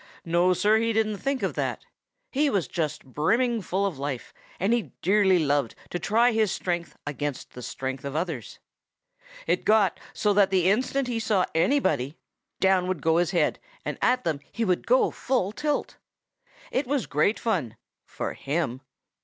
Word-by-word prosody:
No, 175 +2 +3
Sir, 210 +4 +3
he 230 0 +1
didn't 215 -1 +1
think 275 +4 -2
of - - 0
that. - - -3 0.5
He 290 +2 +2
was 200 - 0
just 155 -4 -3
brimming 225 - +1
full 195 +1 -1
of 175 -9 -3
life, 140 -3 -4 0.3
and 195 +6 +2
he 240 -3 -1
dearly 195 0 +4
loved 145 -6 +1 0.2
to 175 - -2
try 230 +7 +3
his 220 -4 +2
strength 175 -2 -3
against 145 -1 -4
the 125 - -9
strength 130 +1 -4
of 140 +1 -5
others. 160 - -3 0.9
It 175 +2 +1
got 210 -4 +3
so 210 -1 +1
that 200 -1 +4
the 185 -1 +3
instant 255 +4 0
he 235 -2 -1
saw 210 -4 +2
anybody, 160 - +1 0.4
down 190 -1 +3
would 185 -6 -2
go 160 0 +3
his 175 -1 +2
head 170 -4 +1 0.3
and - - -4
at 250 0 +2
them 160 -4 -1
he 230 - -1
would 180 -3 0
go 255 +2 +4
full 245 -7 0
tilt. 295 +5 -2 0.7
"It 260 0 0
was 280 -1 0
great 150 +9 +1
fun 160 - -1 0.3
for - - -5
him. 140 -3 -2
185 Hz, 170 wpm, -26 LUFS, 155-225 Hz, 0.9 s, dearly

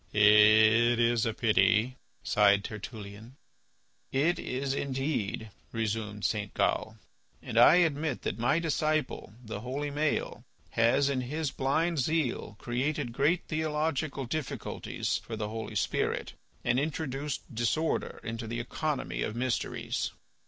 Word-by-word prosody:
"It 110 +3 +6
is 120 -1 +3
a 110 - -1
pity," 115 +2 +3 0.3
sighed 100 -1 +4
Tertullian. 110 +2 -8 0.8
"It 155 +7 +2
is 135 +1 -2
indeed," 135 -6 -2 0.2
resumed 105 -2 -2
St. 105 -2 -1
Gal. - - 0 0.5
"And - - -6
I 120 +8 +8
admit 155 -5 +1
that 110 - -3
my 130 +6 +2
disciple, 155 -8 -1
the 110 - -5
holy 140 +4 -3
Maël, 150 +1 -1 0.3
has, 120 +5 +3
in 135 -2 0
his 145 +3 -2
blind 160 +5 0
zeal, 135 -6 -1
created 130 +2 -2
great 150 +8 +1
theological 155 -2 -1
difficulties 145 +2 -3
for 115 - -7
the 105 -1 -3
Holy 110 0 -6
Spirit - - -1 0.3
and 120 +1 +2
introduced 145 -2 -3
disorder 120 +8 -1
into 115 -1 -5
the 115 +1 -3
economy 145 +4 -3
of 110 - -2
mysteries." 125 0 -2
125 Hz, 125 wpm, -29 LUFS, 110-150 Hz, 0.8 s, I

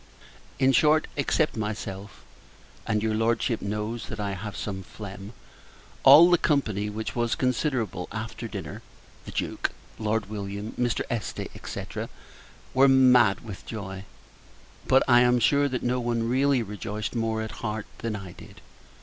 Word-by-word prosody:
In 135 0 +4
short, 155 +4 +4
except 150 +2 +1
myself, 105 -2 -5 0.6
(and 105 -1 0
your 110 -1 +1
Lordship 115 +1 +1
knows 105 +2 -3
that 110 - -7
I 100 -1 -2
have 100 +2 -6
some 95 -2 -4
phlegm) 100 +1 -9 0.7
all 155 +6 +9
the 175 - +5
company, 110 - +1
which 110 +1 -5
was 120 -1 +1
considerable, 125 - -1
after - - -5
dinner - - -7 0.4
the - - -8
Duke, - - -2 0.3
Lord 110 -1 0
William, 100 0 -5
Mr. 120 -1 -1
Este, 115 -4 -3 0.2
&c. - - -4 0.9
were 135 +1 +6
mad 125 -6 +5
with 105 -5 -9
joy. 95 -3 -6 0.8
But, 130 - +5
I 120 -2 +6
am 125 0 +4
sure, 140 +5 +3
that 125 -1 -3
no 125 +1 +1
one 120 -1 -1
really 130 0 +2
rejoiced 105 +1 -5
more, 115 -2 -1
at 110 - -8
heart, 105 -2 -3
than 115 -2 -3
I 95 -3 -7
did. - - -14
110 Hz, 150 wpm, -26 LUFS, 105-125 Hz, 0.9 s, all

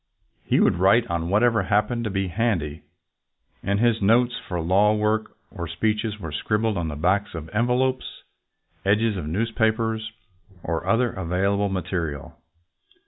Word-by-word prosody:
He - - +2
would - - +3
write 100 +6 +4
on 85 0 -2
whatever 110 +3 +3
happened 105 +3 0
to - - -1
be 95 -1 -1
handy, 85 -7 -1 0.8
and 100 +1 0
his 115 -1 +2
notes 120 +5 +3
for 90 -2 -3
law 100 +6 +3
work 105 +1 -1
or 85 -1 -5
speeches 105 +5 -1
were 80 -5 -6
scribbled 105 +8 0
on 85 -3 -2
the 75 - -4
backs 90 +6 0
of 80 -1 -7
envelopes, 125 +4 -1 0.6
edges 105 +2 +2
of 85 -6 -4
newspapers, 110 +3 0 0.5
or 85 -1 -3
other 120 0 +2
available 100 +3 0
material. 85 -6 -4
105 Hz, 140 wpm, -24 LUFS, 90-110 Hz, 0.8 s, write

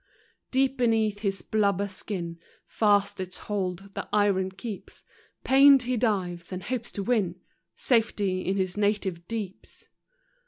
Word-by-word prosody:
Deep 265 +1 +1
beneath 220 -4 +2
his 195 -3 -2
blubber 200 -2 +1
skin 175 -4 -5 0.3
Fast 205 -2 +2
its 185 -1 -5
hold 195 -1 -4
the - - -5
iron 200 -2 +2
keeps; 195 +2 -8 0.4
Pained 275 0 +7
he 250 +1 -1
dives, 185 -7 -1
and 185 0 -5
hopes 240 +2 -4
to 200 - -3
win 195 -6 0 0.4
Safety 210 -6 +1
in 190 +2 -1
his 185 -2 -1
native 200 -4 -1
deeps. 210 -5 -7
205 Hz, 130 wpm, -27 LUFS, 185-225 Hz, 0.4 s, Pained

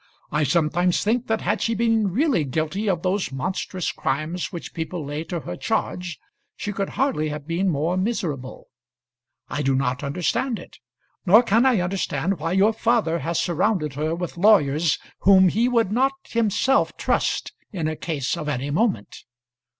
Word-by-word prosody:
I 150 0 +1
sometimes 170 +4 +1
think 235 +4 0
that 220 0 0
had 205 +4 0
she 230 - 0
been 225 -3 +2
really 255 - +2
guilty 160 - -2
of 175 -3 -1
those 185 -5 0
monstrous 180 +6 -3
crimes 155 +6 -2
which 170 - -7
people 165 -1 -4
lay 145 +2 -4
to 170 0 -4
her 90 - -6
charge, 180 - -2 0.4
she 205 - -4
could 195 0 -2
hardly 255 - +1
have 150 -1 -6
been 170 +4 0
more 165 +3 0
miserable. 170 - -3 0.8
I 150 - -3
do 135 -1 +1
not 130 -1 -1
understand 180 - -1
it; - - -13 0.4
nor 215 +5 +6
can 235 +3 +3
I 240 -8 +3
understand 180 -2 -1
why 165 +3 -2
your 200 +4 +4
father 220 -8 +1
has 165 +3 -1
surrounded 170 -3 0
her 155 +4 -1
with 175 -1 -5
lawyers 165 -6 +4 0.2
whom 190 -1 +6
he 230 +7 +1
would 230 -5 +2
not 265 +5 +2
himself 230 +4 +1
trust - - 0 0.2
in 170 -7 -2
a 155 - -2
case 150 -5 -2
of 150 - -4
any 140 0 -2
moment. 205 +6 -1
180 Hz, 165 wpm, -23 LUFS, 155-215 Hz, 0.8 s, nor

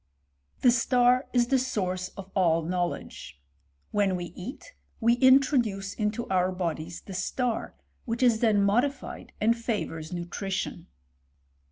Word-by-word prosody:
The 245 - +6
star 245 +1 +3
is 240 -1 +2
the 270 -1 +4
source 185 -8 -2
of 195 -1 -9
all 165 -4 +2
knowledge. 175 - -4 0.5
When 200 -2 +2
we 175 -1 -5
eat, 255 - -9 0.3
we 235 0 +4
introduce 250 -7 +3
into 215 +2 -2
our 185 0 +2
bodies 170 -2 -4
the 195 - -10
star^ 225 +6 -2 0.3
which 235 0 -2
is 235 -3 +4
then 215 -4 +3
modified, 250 +7 -1
and 230 +2 +3
favours 205 -9 -3
nutrition. 180 +2 -4
210 Hz, 130 wpm, -27 LUFS, 185-245 Hz, 0.5 s, The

